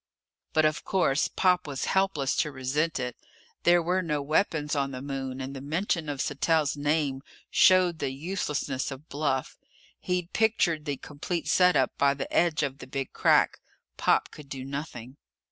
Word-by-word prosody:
But, 155 0 +4
of 155 +1 0
course, 160 -7 +1
Pop 180 -3 +2
was 140 -2 -3
helpless 190 -8 +1
to 150 - +1
resent 140 +4 -1
it. 125 -1 -3 0.5
There 175 0 +5
were 180 +3 +1
no 150 -4 -1
weapons 150 0 0
on 140 -1 0
the 130 -1 -6
Moon 135 -2 -4
and 135 +1 -5
the 135 - -6
mention 165 +2 -1
of 140 -2 -2
Sattell's 150 0 +1
name 145 -2 0 0.3
showed 185 -3 +5
the - - -1
uselessness 145 -2 -3
of 140 +3 -9
bluff. 140 -2 -2 0.4
He'd 180 -1 -2
pictured 185 -8 +2
the 145 -2 -2
complete 155 +5 -5
set 180 -2 +4
up 135 -2 +2
by 140 0 +4
the 135 - -6
edge 165 -3 +3
of 140 -1 -3
the 130 - -9
Big 135 0 -4
Crack. - - +3 0.4
Pop - - +2
could 150 -2 -12
do 130 -2 -6
nothing. 135 -2 -6
145 Hz, 170 wpm, -27 LUFS, 135-165 Hz, 0.5 s, There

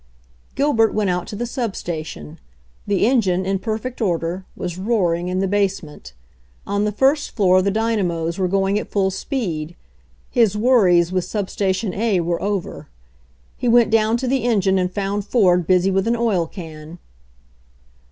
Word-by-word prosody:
Gilbert 260 -6 +2
went 205 -3 +1
out 180 0 -2
to - - -7
the 240 +4 -3
sub 235 -4 -3
station. 155 - -6 0.5
The 200 0 +2
en 250 +1 +4
gine, 185 -2 0
in 195 0 0
perfect 225 +4 -4
order, 175 -1 -1
was 175 0 -5
roaring 180 -5 0
in 185 +1 -1
the 195 - +1
base 200 -1 0
ment. 150 - -12 0.5
On 200 +1 0
the 210 - 0
first 270 +7 +1
floor 185 -4 +4
the 200 - +1
dynamos 195 -6 -1
were 185 - +1
going 195 +2 +1
at - - -7
full 195 -2 +1
speed. 180 - -4 0.6
His 225 -5 +2
worries 190 -8 +4
with 185 -1 -1
sub 205 -3 -3
station 190 0 -1
A 215 -3 +1
were 170 0 -1
over. 200 -2 -3 0.7
He 245 - -3
went 235 -1 +4
down 220 +1 +3
to 255 +1 -3
the 265 -1 0
engine 195 -5 +2
and 180 0 -1
found 200 +1 -2
Ford 180 -6 +2
busy 185 +1 +3
with 195 +2 0
an 235 - +2
oil 215 -8 0
can. 160 -2 -10
195 Hz, 170 wpm, -20 LUFS, 180-225 Hz, 0.7 s, en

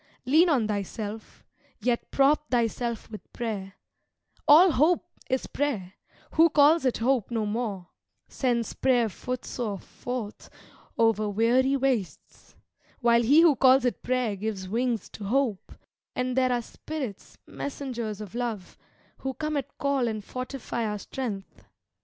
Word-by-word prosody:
Lean 315 +7 +5
on 250 -9 +2
thyself, 210 +1 -5 0.3
yet 240 -1 -1
prop 295 +2 +3
thyself 235 -1 -1
with 215 - -10
prayer, 200 -5 -4 0.7
(All 335 +5 +8
hope 325 +5 +3 0.2
is 260 0 0
prayer; 220 -11 -2 0.4
who 330 +1 +5
calls 295 +1 +5
it 255 - +2
hope 245 -2 +1
no 225 -3 -1
more, 205 -4 -3 0.4
Sends 240 -4 -1
prayer 245 -4 +2
footsore 240 0 -4
forth 240 +2 -7 0.5
over 225 -2 +2
weary 245 +6 +3
wastes, 255 -8 -3 0.5
While 235 -1 +4
he 280 +8 +6
who 330 -4 +6
calls 260 0 +5
it 245 - -1
prayer 250 -4 0
gives 200 -2 -4
wings 235 +1 -1
to 205 - -8
hope,) 235 -2 0 0.4
And 250 0 -1
there 255 -1 +3
are 240 -1 0
spirits, 265 -6 -7
messengers 240 -7 -5
of 205 -4 -8
Love, 230 -6 -4 0.4
Who 265 -1 -4
come 305 0 -2
at 280 -3 -4
call 280 -3 +1
and 215 -2 -3
fortify 255 -2 -4
our 210 -1 -2
strength. 205 -3 -6
240 Hz, 135 wpm, -27 LUFS, 215-270 Hz, 0.7 s, All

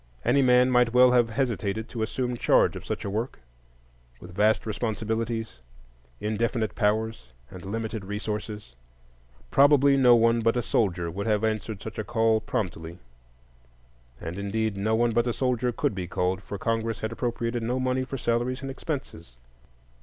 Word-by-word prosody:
Any 140 - +4
man 125 0 +4
might 125 -1 +3
well 125 0 +6
have 120 -2 +3
hesitated 110 -3 -2
to 115 - -5
assume 125 +2 -2
charge - - +3
of - - -7
such - - -4
a - - -2
work, 115 +5 -3 0.8
with 90 +4 -12
vast 105 +4 +2
responsibilities, 110 - -3 0.6
indefinite 110 +1 -1
powers, 105 - -1 0.2
and 90 - -10
limited 110 +1 -4
resources. 105 - -5 0.8
Probably 140 0 +5
no 125 -2 +6
one 115 0 +3
but 115 +2 +2
a 120 - 0
soldier 85 -8 0
would 100 +5 -4
have 105 -1 +1
answered 110 -2 -2
such 110 0 -7
a - - -1
call 110 0 +2
promptly; 85 -7 -4 1.2
and, 85 +4 -6
indeed, 105 +1 -1
no 105 +3 0
one 120 +1 +2
but 120 +2 +1
a 120 - 0
soldier 125 -1 0
could 115 - -1
be 95 -2 -4
called, 90 +2 -1
for 100 - -7
Congress 115 +1 -2
had 110 - -2
appropriated 120 0 -2
no 120 +3 -1
money 130 0 0
for 135 +1 -5
salaries 120 +2 -1
and 135 - -4
expenses. 130 - -6
115 Hz, 160 wpm, -26 LUFS, 105-120 Hz, 1.2 s, well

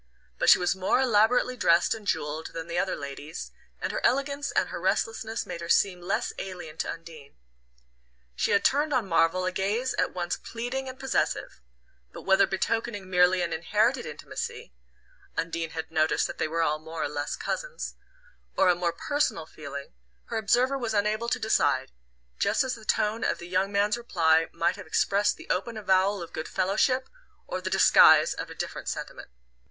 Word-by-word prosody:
But - - +3
she - - +9
was 180 +1 +1
more 190 +6 +1
elaborately 245 +1 +3
dressed 170 -8 +3
and 220 -2 -9
jewelled 150 -1 -2
than 165 -1 -5
the 170 +1 -1
other 190 - 0
ladies, 145 +3 -7 0.3
and - - -2
her - - -4
elegance 280 +1 +1
and - - 0
her - - -6
restlessness 225 - -1
made 170 - -6
her 170 - -6
seem 180 -1 +3
less 180 +3 -1
alien 175 -5 -7
to - - -2
Undine. 160 -4 -11 1.0
She - - 0
had 200 - +2
turned 295 +2 +2
on 235 -6 0
Marvell 170 +1 +2
a 185 - 0
gaze 205 +7 -1
at - - +1
once 175 -1 -2
pleading 250 +3 -5
and 260 +1 -10
possessive; 265 - -1 0.5
but - - -10
whether 190 +1 +4
betokening 205 0 -2
merely 180 0 +4
an 170 -1 -2
inherited 215 +10 +1
intimacy 470 0 -6 0.6
(Undine 165 0 -2
had 160 0 -6
noticed 155 -1 +2
that - - -6
they - - +1
were 165 +1 0
all 155 -1 0
more 160 +1 -5
or - - 0
less 145 0 -3
cousins) - - -4 0.6
or 185 - +5
a 180 - +5
more 175 -1 -1
personal 230 - -1
feeling, 140 - -9 0.4
her - - -2
observer 250 +6 +2
was 225 -3 -2
unable 215 +3 0
to 250 - +1
decide; 145 - +1 0.5
just 205 +6 +2
as 260 -1 -2
the 220 -2 -10
tone 215 +2 +1
of - - +1
the 175 - -9
young 185 +2 0
man's 205 +3 +1
reply 165 -8 +2
might 165 - 0
have - - -10
expressed 200 +5 +2
the - - -12
open 220 +5 -2
avowal 195 -1 +2
of 170 - -11
good 155 - -4
fellowship 255 +8 +1 0.4
or 185 - -4
the 185 - -3
disguise 190 +1 +6
of - - -6
a - - -9
different - - -5
sentiment. - - -6
190 Hz, 185 wpm, -27 LUFS, 165-230 Hz, 1.0 s, she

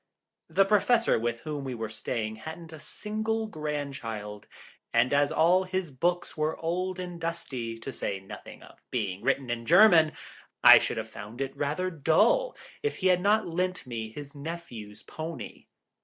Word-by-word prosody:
The 195 - +4
Professor 215 - +3
with 120 0 -2
whom 150 -2 -4
we 130 -2 -4
were 110 -1 -3
staying 110 -1 -3
hadn't 160 +6 -9
a 160 - -9
single 220 +5 -3
grandchild, 140 - -5 0.4
and 120 +3 +3
as 145 0 +3
all 175 +4 +4
his 185 -3 -3
books 175 +7 -1
were 155 +1 -1
old 180 +3 -2
and 175 -2 -6
dusty, 130 -9 -4
to 125 +4 -7
say 100 - -3
nothing 95 - -11
of - - -16
being 100 -6 -2
written 135 -2 0
in 115 -1 -4
German, 170 -3 +7 0.5
I - - +11
should - - -2
have - - -5
found 110 +4 -9
it 135 -1 -3
rather 155 +6 -1
dull 185 - +3 0.2
if 440 - -1
he 185 - +1
had 180 -1 +4
not 210 +3 +3
lent 180 +1 -2
me 115 -3 -5
his 140 +4 -9
nephew's 140 -9 -8
pony. 160 +1 -7
155 Hz, 165 wpm, -28 LUFS, 120-180 Hz, 0.5 s, I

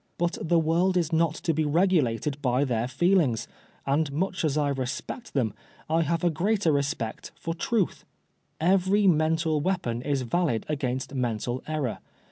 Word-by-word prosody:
But 175 0 -1
the 170 +1 +2
world 170 +3 +2
is 165 -2 0
not 160 -1 +2
to 170 -4 -1
be 155 +1 +1
regulated 150 -5 +1
by 125 0 +2
their 120 -2 0
feelings, 140 - +2 0.4
and 140 +2 +1
much 185 +6 -1
as 155 -2 +1
I 145 -1 +2
respect 135 - -4
them, 115 -6 +1 0.3
I 160 +2 +2
have 165 +1 0
a 175 - +3
greater 190 +2 +1
respect 140 -5 -2
for 165 - -4
trutL 195 +3 -1 0.6
Every 190 +4 +3
mental 160 -2 +2
weapon 145 -10 -1
is 140 -1 -1
valid 135 -3 0
against 130 -3 -2
mental 120 -1 -2
error. 150 -6 -2
155 Hz, 155 wpm, -27 LUFS, 130-175 Hz, 0.6 s, a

